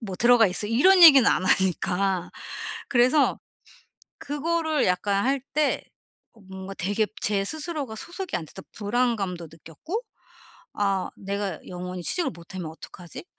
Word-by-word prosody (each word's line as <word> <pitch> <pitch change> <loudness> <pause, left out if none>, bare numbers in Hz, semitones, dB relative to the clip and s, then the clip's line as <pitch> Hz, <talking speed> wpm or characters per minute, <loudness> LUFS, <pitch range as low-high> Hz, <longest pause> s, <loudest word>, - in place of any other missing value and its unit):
뭐 205 -5 -6
들어가 240 0 +5
있어." 185 +3 -1
이런 360 +11 +5
얘기는 275 -7 +9
안 185 - 0
하니까. 190 0 +1 0.6
그래서 255 +3 +3 0.8
그거를 315 +1 -1
약간 195 +3 +1
할 270 0 +1
때 300 0 +1 0.7
뭔가 190 +1 -8
되게 205 +4 0 0.2
제 200 -2 +1
스스로가 305 - -4
소속이 360 - -6
안 165 - -7
됐다 - - -12
불안감도 205 -6 -1
느꼈고 165 - -6 0.8
'아 195 -2 0
내가 200 -3 -4
영원히 180 0 -6
취직을 355 -2 0
못 170 +2 -14
하면 170 -4 -5
어떡하지?' 170 0 -11
205 Hz, 285 characters per minute, -25 LUFS, 185-280 Hz, 0.8 s, 얘기는